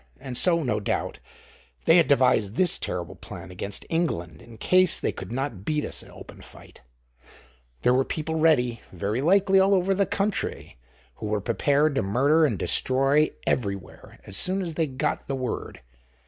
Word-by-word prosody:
And 125 - -7
so, 170 +3 +2
no 110 -5 -1
doubt, 100 - -3 0.7
they 165 - +6
had 170 - +4
devised 125 -7 +2
this 185 +3 +3
terrible 90 0 -4
plan 95 -2 -10
against 100 +2 -5
England 85 - -2
in 115 -1 -14
case 185 +7 +4
they - - -1
could - - -9
not 120 -6 -4
beat 150 +4 -1
us - - -4
in - - -15
open - - -13
fight: - - -16 1.0
there 125 - +4
were 130 +1 +3
people 160 +3 -4
ready, 125 -8 +2
very 100 +7 -2
likely, 190 +4 +4
all 195 +1 +4
over 190 +1 +1
the 195 0 +1
country, 200 - -3 0.4
who 110 - -5
were 105 0 0
prepared 145 +7 +1
to 135 - 0
murder 140 +10 +3
and - - -2
destroy 135 +4 +2 0.2
everywhere 100 -5 -4
as 100 - -6
soon 190 - +1
as 170 -2 -4
they 160 0 0
got 130 -1 -3
the 135 - -2
word. 130 - -5
135 Hz, 175 wpm, -25 LUFS, 105-165 Hz, 1.0 s, they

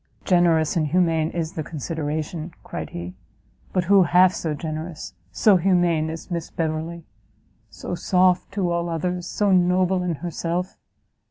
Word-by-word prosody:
"Generous 170 -4 +3
and 155 -3 +1
humane 165 -1 +2
is 165 -2 -3
the 160 - -3
consideration," 155 +1 -4
cried - - -6
he; 85 +1 -7 0.6
"but 185 - +1
who 195 +2 +5
half 180 +1 +5
so 155 -3 -3
generous, 155 - -6 0.2
so 205 - +4
humane 175 -3 +2
as 165 +3 -8
Miss 170 -2 -3
Beverley? 165 +1 -3 0.6
so - - -7
soft 180 0 +2
to 185 -4 0
all 170 0 -1
others, 175 +2 -2
so 205 -2 +1
noble 180 0 +3
in 180 -2 -1
herself? 175 +2 -3
170 Hz, 145 wpm, -23 LUFS, 160-180 Hz, 0.6 s, who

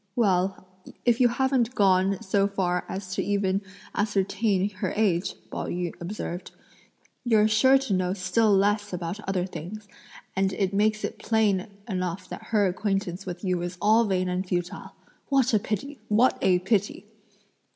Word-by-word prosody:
"Well, 190 -4 +1 0.4
if 240 0 +3
you 245 - +7
haven't 250 0 +1
gone 190 -1 +3
so 195 +1 +2
far 180 -3 -1
as 190 -1 -5
to - - -1
even 200 -1 0 0.3
ascertain 200 0 0
her 190 -1 -3
age," 195 -4 +1 0.2
Pao - - -4
yü 175 -1 -3
observed, 175 -1 -5 0.7
"you're 220 -3 +4
sure 260 +5 +5
to 265 -6 -2
know 185 -1 +1
still 210 +3 +2
less 205 +1 +2
about 175 +2 -4
other 185 -2 0
things; 195 +4 -8 0.5
and 195 0 +1
it 195 -1 -1
makes 215 +1 +1
it - - -4
plain 215 -4 +1 0.2
enough 185 -3 -3
that - - -8
her 210 -3 +2
acquaintance 195 -1 -2
with 175 +1 -6
you 180 -2 0
is 175 +1 -5
all 220 +4 +4
vain 185 -3 0
and 180 +1 -2
futile! 175 -1 -4 0.3
What 265 -3 +3
a 215 - +5
pity! 220 +8 -4
what 225 +5 +4
a 185 -1 +4
pity!" 195 +1 -1
195 Hz, 160 wpm, -26 LUFS, 185-215 Hz, 0.7 s, you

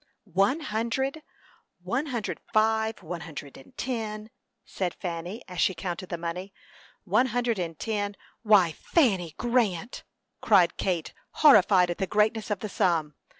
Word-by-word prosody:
"One 200 - +1
hundred, 265 +2 -2 0.6
one 245 +11 -1
hundred 240 -6 -3
five, 220 -1 +2
one 170 +1 -5
hundred 145 -4 -8
and 135 - -16
ten," 220 -3 -4 0.3
said 180 -3 -3
Fanny, 175 +4 -5
as 180 -2 -3
she 190 - +2
counted 180 +1 -5
the 170 - -3
money; 175 +4 -5 0.5
"one 255 - +3
hundred 240 -3 0
and 165 -3 -4
ten 205 -2 -2 0.2
" - - -36
"Why, 205 -6 +5
Fanny 190 - +1
Grant!" 235 -5 0 0.4
cried 190 -6 +4
Kate, 175 -4 -2 0.3
horrified 190 -9 +7
at 175 - -5
the 190 - 0
greatness 215 +3 +1
of 205 -2 -2
the 215 - -3
sum. 160 -6 +1
205 Hz, 150 wpm, -27 LUFS, 175-225 Hz, 0.6 s, horrified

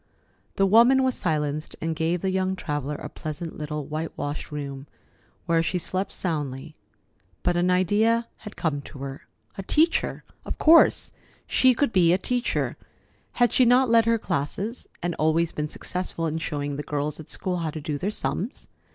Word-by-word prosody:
The 195 - +3
woman 235 +6 +6
was 260 -1 +2
silenced, 155 -5 -2
and 165 0 -2
gave 165 +2 0
the 190 - 0
young 190 0 0
traveller 150 -4 -3
a - - -6
pleasant 155 +1 -6
little 150 -1 -4
whitewashed 155 -1 -4
room, 140 -1 -6 0.6
where 165 -2 +3
she 180 +2 -1
slept 185 +2 -2
soundly. 150 -4 -3 0.7
But 175 - +2
an 175 +1 +2
idea 210 +6 +2
had 210 -1 -10
come 145 -4 -1
to 140 - -11
her. 135 0 -7 0.3
A - - 0
teacher! 315 - +1 0.2
Of - - -5
course, 325 +1 +5 0.3
she 255 -1 +4
could 255 -3 +1
be 175 -3 +5
a - - +4
teacher. 245 +5 -1 0.6
Had 240 -1 +3
she 255 - +5
not 250 +1 +5
led 230 -1 +6
her 230 0 +3
classes, 200 - -3 0.2
and 175 0 0
always 160 +2 +2
been 150 0 -3
successful 180 -1 -4
in 160 0 -1
showing 145 -3 -3
the - - -2
girls 150 +1 -3
at 155 - -10
school 180 -1 -2
how 165 -2 -2
to 155 - -5
do 150 -1 -3
their 195 - -1
sums? 215 +2 -3
170 Hz, 175 wpm, -25 LUFS, 150-205 Hz, 0.7 s, woman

